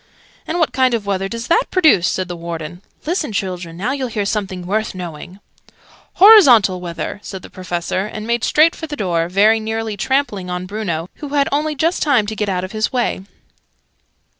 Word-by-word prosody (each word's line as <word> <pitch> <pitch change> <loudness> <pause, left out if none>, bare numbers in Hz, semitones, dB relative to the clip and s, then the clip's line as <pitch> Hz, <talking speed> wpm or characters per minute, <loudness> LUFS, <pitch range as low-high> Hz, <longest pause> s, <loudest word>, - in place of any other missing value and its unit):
"And 335 - -2
what 325 -3 +1
kind 260 -2 +2
of 215 -3 -4
weather 195 -1 -1
does 230 +2 -5
that 450 - +2
produce?" 310 - +4
said 185 -1 -1
the 175 - -5
Warden. 170 0 -7 0.2
"Listen, 320 - -1
children! 180 -4 -4
Now 215 +8 -2
you'll 270 -2 -2
hear 215 -3 -3
something 195 -3 -3
worth 215 +2 -2
knowing!" 175 +1 -8 0.7
"Horizontal 260 - +7
weather," 175 +3 -5
said 190 -3 -8
the - - -12
Professor, 185 +1 -3
and 215 0 -7
made 235 0 -1
straight 315 +2 +4
for 320 - -7
the 295 - -5
door, 170 - -1
very 210 +4 +4
nearly 220 0 -3
trampling 205 -5 -1
on 180 0 -4
Bruno, 185 -5 -3
who 295 -1 -6
had 280 -1 +3
only 300 +2 0
just 330 +5 0
time 260 -8 +3
to 215 +1 -5
get 210 -1 -2
out 180 -1 -1
of 185 - -6
his 215 0 -1
way. 245 -6 -1
210 Hz, 190 wpm, -18 LUFS, 180-265 Hz, 0.7 s, Horizontal